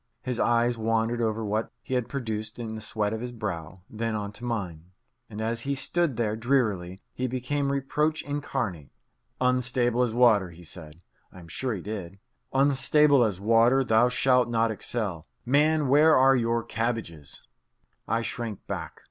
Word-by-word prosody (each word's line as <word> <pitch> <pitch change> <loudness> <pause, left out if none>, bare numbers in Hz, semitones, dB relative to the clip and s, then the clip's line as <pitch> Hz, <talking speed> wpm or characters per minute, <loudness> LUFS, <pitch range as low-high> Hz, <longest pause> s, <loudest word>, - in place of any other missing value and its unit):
His 125 -2 -3
eyes 120 0 +2
wandered 115 +1 0
over 110 -1 -1
what 110 +2 -1
he - - -5
had 125 -2 0
produced 110 -5 -4
in 115 -2 -5
the 110 - -6
sweat 105 -1 -1
of 110 - -4
his 125 0 -4
brow, 95 -6 -6
then 115 0 -3
on 105 -1 -3
to 105 +4 -8
mine. 95 -10 -4 0.4
And 105 -1 -8
as 115 +1 -1
he 140 +3 -2
stood 160 -1 0
there 110 -2 0
drearily, 110 -7 0
he 130 - -2
became 140 +3 -1
reproach 150 +3 0
incarnate. 115 - -3 0.5
"Unstable 125 -1 +1
as 125 -2 +1
water," 110 -6 +4
he 85 +1 -14
said 80 -1 -11 0.3
(I - - -15
am 85 -2 -12
sure 120 +8 -3
he 95 - -6
did) 100 -2 -6 0.3
"unstable 140 0 +4
as 105 -5 -1
water, 115 +5 +4
thou 115 0 +4
shalt 125 -1 +3
not 115 -1 +1
excel. 105 -6 -3 0.2
Man, 150 +3 +3
where 150 +4 +6
are 135 +1 +6
your 115 -1 +1
cabbages?" 110 - -4 0.6
I 115 +2 0
shrank 115 -5 -5
back. - - -6
115 Hz, 165 wpm, -27 LUFS, 105-130 Hz, 0.6 s, where